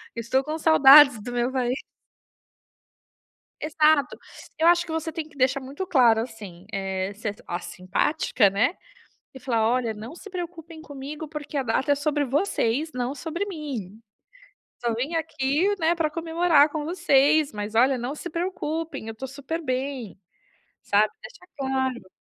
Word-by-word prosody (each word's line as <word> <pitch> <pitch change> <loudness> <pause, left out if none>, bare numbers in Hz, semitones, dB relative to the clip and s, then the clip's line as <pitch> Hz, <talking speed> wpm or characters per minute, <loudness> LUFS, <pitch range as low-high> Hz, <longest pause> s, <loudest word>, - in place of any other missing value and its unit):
Estou 235 +4 0
com 305 +2 -4
saudades 280 -6 +7
do 245 - -6
meu 245 0 0
país. 255 0 -1 1.8
Exato. 305 -2 +2 0.4
Eu 325 +2 +4
acho 345 0 +4
que 320 - -6
você 320 0 -3
tem 320 -2 -5
que 310 - -21
deixar 260 +1 +2
muito 275 +8 -6
claro, 245 -10 +4
assim, 205 -6 -9
eh, 190 0 -3
ser 210 0 -4
a 175 - -3
simpática 185 - 0
né, 220 - +1 0.6
e 265 - -10
falar: 230 -4 +1
"Olha, 240 -2 0
não 225 +9 -9
se 410 - -11
preocupem 335 -3 -7
comigo, 290 +2 -8
porque 300 -1 -6
a 270 - 0
data 255 +4 0
é 285 - +4
sobre 295 0 0
vocês, 285 - 0
não 250 +1 -2
sobre 340 +6 -4
mim. 260 - -6 0.8
Só 235 -1 0
vim 270 +9 -3
aqui, 320 +4 0
né, 330 +1 +2
para 320 -2 0
comemorar 325 -2 +3
com 300 0 -4
vocês. 310 -3 +3
Mas 210 +1 -6
olha, 255 +3 +4
não 250 +4 -4
se 350 - -7
preocupem, 330 -6 -4
eu 225 - -5
estou 265 +4 -7
super 280 +5 -5
bem". 260 - -4 0.7
Sabe, 210 +1 +2
deixa 485 -5 -13
claro. 260 -5 -2
280 Hz, 155 wpm, -25 LUFS, 240-320 Hz, 1.8 s, saudades